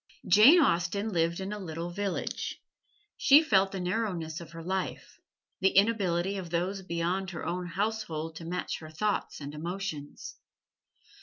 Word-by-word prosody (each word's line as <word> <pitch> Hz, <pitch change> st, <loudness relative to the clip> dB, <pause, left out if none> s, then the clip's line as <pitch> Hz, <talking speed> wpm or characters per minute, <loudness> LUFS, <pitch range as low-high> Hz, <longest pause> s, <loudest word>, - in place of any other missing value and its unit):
Jane 255 Hz, -, +8 dB
Austen 200 Hz, -, +1 dB
lived 170 Hz, -2 st, 0 dB
in 190 Hz, +2 st, -4 dB
a 210 Hz, -, -5 dB
little 170 Hz, -2 st, -5 dB
village. 200 Hz, +1 st, -3 dB, 0.6 s
She 290 Hz, +3 st, +7 dB
felt 195 Hz, -8 st, +3 dB
the 195 Hz, -, -4 dB
narrowness 180 Hz, -4 st, -2 dB
of 165 Hz, -, -10 dB
her 165 Hz, 0 st, -8 dB
life 190 Hz, +2 st, -4 dB, 0.4 s
the 190 Hz, -, +2 dB
inability 195 Hz, -3 st, +2 dB
of 180 Hz, -3 st, -6 dB
those 180 Hz, +4 st, -1 dB
beyond 180 Hz, +2 st, -2 dB
her 175 Hz, -, -6 dB
own 180 Hz, +1 st, -3 dB
household 175 Hz, -5 st, -3 dB
to 165 Hz, -, -8 dB
match 180 Hz, +2 st, -3 dB
her 155 Hz, -, -10 dB
thoughts 205 Hz, +7 st, -2 dB
and 145 Hz, 0 st, -7 dB
emotions. 160 Hz, -2 st, -6 dB
180 Hz, 150 wpm, -29 LUFS, 170-200 Hz, 0.6 s, Jane